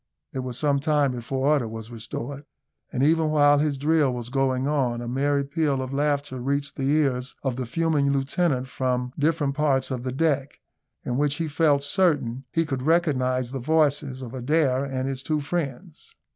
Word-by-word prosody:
It 130 - -3
was 125 -2 -4
some 145 -2 +2
time 145 -2 +2
before 130 +3 -1
order 145 -6 +2
was 110 +1 -8
restored; 120 +5 -6 0.5
and 130 - 0
even 160 +1 +3
while 145 -1 +5
his 145 -2 0
drill 150 -1 +2
was 120 -1 -5
going 130 -1 0
on, 130 -5 0
a 120 - -5
merry 140 +3 +1
peal 140 -1 0
of 130 +1 -4
laughter 145 -2 0
reached 140 +2 -2
the 135 -1 -1
ears 135 -4 +1
of 135 -3 -1
the 130 -1 -4
fuming 155 0 +1
lieutenant 135 0 0
from 125 -1 -2
different 150 -2 +1
parts 140 -2 +1
of 125 -2 -2
the 130 +1 -3
deck, 140 -1 0 0.4
in 125 - -2
which 145 0 +1
he 165 0 -2
felt 145 -2 +2
certain 145 -7 +1
he 165 0 +1
could 135 -4 -3
recognise 130 -6 +1
the 135 - -4
voices 140 -2 +1
of 120 -1 -8
Adair 135 0 +1
and 130 -1 -3
his 135 -1 -3
two 155 +2 -1
friends. 155 +1 -5
140 Hz, 185 wpm, -25 LUFS, 130-150 Hz, 0.5 s, while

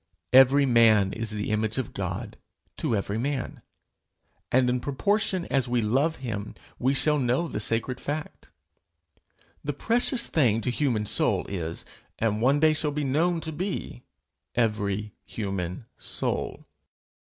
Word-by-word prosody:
Every 135 +2 +7
man 110 -6 +5
is 115 -1 -4
the 105 0 -3
image 110 +1 0
of 130 -4 -3
God 100 +3 -4 0.4
to 115 - 0
every 100 +1 -2
man, 135 +1 -3 0.9
and 125 0 +4
in 125 0 +1
proportion 185 - 0
as 135 -3 +2
we 120 0 +2
love 135 +9 +1
him, 105 -3 -4 0.2
we 130 +3 +2
shall 150 +2 +3
know 130 +6 +1
the - - -4
sacred 115 +4 0
fact. 150 +1 -5 1.1
The 145 - -2
precious 235 - +1
thing 120 -8 +2
to 125 - -1
human 120 -6 0
soul - - +1
is, 85 -4 -4 0.3
and 110 -1 0
one 135 +4 +3
day 155 0 +5
shall 155 0 0
be 145 0 -2
known 165 +5 +1
to 160 - -3
be, 175 -6 -4 0.5
every 105 -2 0
human 95 -1 -4
soul. - - -3
125 Hz, 140 wpm, -26 LUFS, 105-145 Hz, 1.1 s, Every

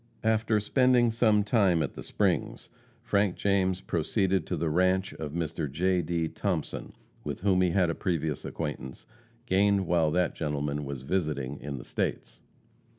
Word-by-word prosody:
After 110 0 +2
spending 125 +2 +3
some 110 -2 +3
time 100 -7 +3
at 70 - -4
the - - -8
Springs, - - -1 0.3
Frank 100 -5 +1
James 95 -2 +1
proceeded 95 +2 0
to - - -2
the 80 - -1
ranche 95 +4 +1
of 75 -2 -6
Mr. 80 -3 -3
J. 90 +4 +1
D. 85 0 -1
Thompson, - - -3 0.3
with - - -5
whom 95 -2 +3
he 90 - +3
had 85 -1 +2
a - - -2
previous 80 -4 -2
acquaintance, 75 -5 -5 0.4
gained 100 -2 +3
while 85 -2 +2
that 90 +2 +1
gentleman 75 -1 -2
was 70 -2 -6
visiting 75 -4 -2
in 70 -1 -5
the - - -8
States. - - -4
90 Hz, 155 wpm, -28 LUFS, 75-100 Hz, 0.4 s, spending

